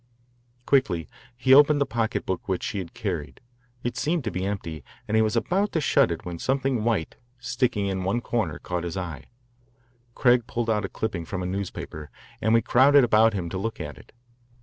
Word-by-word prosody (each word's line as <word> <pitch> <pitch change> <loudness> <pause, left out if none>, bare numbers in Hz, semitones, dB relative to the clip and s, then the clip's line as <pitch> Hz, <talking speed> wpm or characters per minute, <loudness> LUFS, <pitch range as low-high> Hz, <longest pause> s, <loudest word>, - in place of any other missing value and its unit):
Quickly 95 - +2 0.3
he 130 +1 +4
opened 145 +1 +7
the 140 - +2
pocketbook 110 -6 -2
which 95 - -1
she 110 -3 -2
had 90 -3 -7
carried. 85 -8 -4 0.4
It 120 - -2
seemed 160 0 0
to 110 - -2
be 90 - -3
empty, 85 -7 -5 0.2
and 110 - 0
he 110 - +5
was 110 +1 +1
about 195 - 0
to 160 - +2
shut 135 - +3
it 85 - -5
when 85 -2 -5
something 135 -2 0
white, 110 -9 -1 0.2
sticking 125 -4 -1
in 95 -1 -2
one 100 +6 0
corner, 110 -9 -2
caught 90 -1 -4
his 85 +1 -4
eye. 85 -7 -5 0.9
Craig 120 -2 +3
pulled 115 -1 -1
out 105 -2 0
a - - -5
clipping 100 -6 -3
from 95 +1 -4
a - - -3
newspaper, 90 -5 -5 0.3
and 110 - +2
we 115 -1 +4
crowded 140 +4 +5
about 110 -1 +4
him 90 -3 -2
to 95 - -4
look 115 +3 -3
at 75 - -6
it. - - -18
110 Hz, 195 wpm, -25 LUFS, 90-125 Hz, 0.9 s, opened